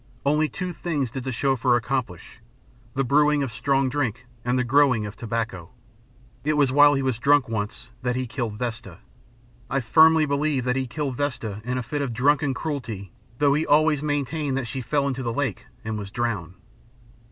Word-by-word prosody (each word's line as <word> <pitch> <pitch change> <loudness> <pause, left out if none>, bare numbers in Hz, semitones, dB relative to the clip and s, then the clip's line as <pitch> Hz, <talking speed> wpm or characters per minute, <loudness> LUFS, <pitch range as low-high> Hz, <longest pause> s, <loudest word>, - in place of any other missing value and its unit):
Only 150 +2 +2
two 180 -2 -4
things 150 -7 -2
did 130 -1 -6
the 130 - -2
Chauffeur 125 0 +2
accomplish 120 -7 -3 0.6
the 135 - +1
brewing 145 +2 +3
of 130 - -3
strong 135 +4 +1
drink 125 -3 -2 0.2
and 125 +1 +1
the 125 - +2
growing 125 -3 +3
of 105 - -7
tobacco. 110 -7 -4 0.7
It 155 +2 +1
was 140 -3 +3
while 145 +1 +6
he 135 - 0
was 130 -4 -1
drunk, 140 0 +4
once, 110 +1 -4
that 125 -1 -1
he 130 0 -1
killed 120 -4 -4
Vesta. 120 -1 -5 0.7
I 135 - +1
firmly 160 +6 +5
believe 140 -2 0
that 125 0 0
he 130 -1 -1
killed 135 0 -3
Vesta 115 -8 -3
in 125 +2 -2
a 125 - -2
fit 145 +5 -3
of 130 -4 -2
drunken 140 +3 +2
cruelty 120 - -5 0.3
though 145 0 +3
he 150 +2 +1
always 150 -1 +4
maintained 145 -1 -1
that 135 - -2
she 130 +2 -4
fell 140 +2 0
into 135 -1 -2
the 120 -2 -2
lake 125 -4 -2 0.2
and 110 -1 -3
was 100 -1 -6
drowned. 100 -6 -3
130 Hz, 185 wpm, -24 LUFS, 115-145 Hz, 0.7 s, while